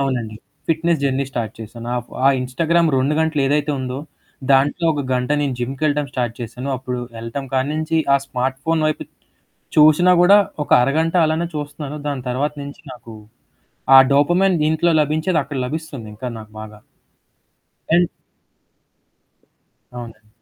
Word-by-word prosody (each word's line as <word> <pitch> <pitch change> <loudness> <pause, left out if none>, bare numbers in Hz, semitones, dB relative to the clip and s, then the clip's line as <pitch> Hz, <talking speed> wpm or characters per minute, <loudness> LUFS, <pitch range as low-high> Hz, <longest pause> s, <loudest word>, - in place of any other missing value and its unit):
అవునండి. 120 -6 -2 0.3
Fitness 165 -1 +1
journey 135 0 0
start 115 -4 -4
చేశాను. 115 +2 -8
ఆహ్, 120 0 -5 0.2
ఆ - - +8
ఇన్‌స్టాగ్రామ్ 165 +6 +1
2 135 +4 +1
గంటలు 160 -2 0
ఏదైతే 145 +1 +1
ఉందో, 130 +1 -4 0.5
దాంట్లో 145 +5 +2
ఒక 145 -1 -2
గంట 125 +2 -1
నేను 140 -3 -1
జిమ్‌కెళ్లటం 145 +3 -1
స్టార్ట్ 120 -2 -2
చేశాను. 120 +3 -6
అప్పుడు 125 -1 -5 0.2
ఎళ్లటం 115 +4 -5
కాడి 130 +1 +1
నుంచి 155 +1 0 0.2
ఆ - - +7
స్మార్ట్‌ఫోన్ 135 +5 -1
వైపు 155 - -2 0.7
చూసినా 155 +4 +6
కూడా 195 +3 +7 0.3
ఒక - - -19
అరగంట 160 +6 +1
అలానే 160 +2 0
చూస్తున్నాను. 145 0 -5
దాని 140 -3 -3
తర్వాత 140 +4 -1
నుంచి 140 +3 -10
నాకు 115 -2 -12 0.8
ఆ - - +11
డోపమైన్ 175 +6 +3
దీంట్లో 160 +3 +2
లభించేది 155 +3 0
అక్కడ 140 0 -6
లభిస్తుంది. 145 -6 -6
ఇంకా 120 +5 -7
నాకు 110 -1 -12
బాగా. 105 -1 -10 1.2
ఎన్ 175 -1 +3 1.9
అవునండి. 115 -3 -10
140 Hz, 140 wpm, -20 LUFS, 125-155 Hz, 1.9 s, ఆ